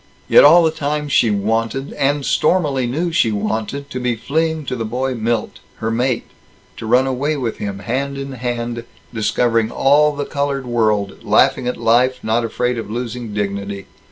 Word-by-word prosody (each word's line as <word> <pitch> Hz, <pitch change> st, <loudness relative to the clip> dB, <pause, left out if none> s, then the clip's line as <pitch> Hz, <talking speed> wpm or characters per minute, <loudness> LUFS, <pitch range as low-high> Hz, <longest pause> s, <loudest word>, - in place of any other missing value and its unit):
Yet -, -, +7 dB
all 170 Hz, +4 st, +8 dB
the 160 Hz, -, +3 dB
time 150 Hz, -1 st, -3 dB
she 120 Hz, -, +3 dB
wanted, 115 Hz, +6 st, -1 dB
and 140 Hz, 0 st, 0 dB
stormily 140 Hz, -8 st, +1 dB
knew 165 Hz, +8 st, -1 dB
she 120 Hz, -9 st, +2 dB
wanted, 110 Hz, +7 st, -3 dB
to 130 Hz, -, -4 dB
be 125 Hz, -1 st, 0 dB
fleeing 160 Hz, +5 st, -1 dB
to 130 Hz, -, -3 dB
the 115 Hz, -, -3 dB
boy 130 Hz, +4 st, -2 dB
Milt, 115 Hz, -1 st, -2 dB, 0.2 s
her 110 Hz, +1 st, -3 dB
mate; 120 Hz, +1 st, 0 dB, 0.5 s
to 110 Hz, -, -6 dB
run 125 Hz, +3 st, +4 dB
away 140 Hz, +4 st, -1 dB
with 120 Hz, -5 st, -3 dB
him, 100 Hz, -1 st, -4 dB
hand 135 Hz, +7 st, -3 dB
in 135 Hz, 0 st, -5 dB
hand, 120 Hz, -2 st, -4 dB, 0.3 s
discovering 115 Hz, 0 st, +1 dB
all 145 Hz, +4 st, +3 dB
the 145 Hz, 0 st, -3 dB
colored 140 Hz, -2 st, -2 dB
world, 110 Hz, -4 st, 0 dB
laughing 125 Hz, -, +3 dB
at 125 Hz, -, -2 dB
life, 120 Hz, +3 st, +3 dB
not 115 Hz, +2 st, +1 dB
afraid 125 Hz, +1 st, -1 dB
of 110 Hz, -, -7 dB
losing 120 Hz, 0 st, -5 dB
dignity. 100 Hz, -1 st, -3 dB
125 Hz, 175 wpm, -19 LUFS, 115-140 Hz, 0.5 s, all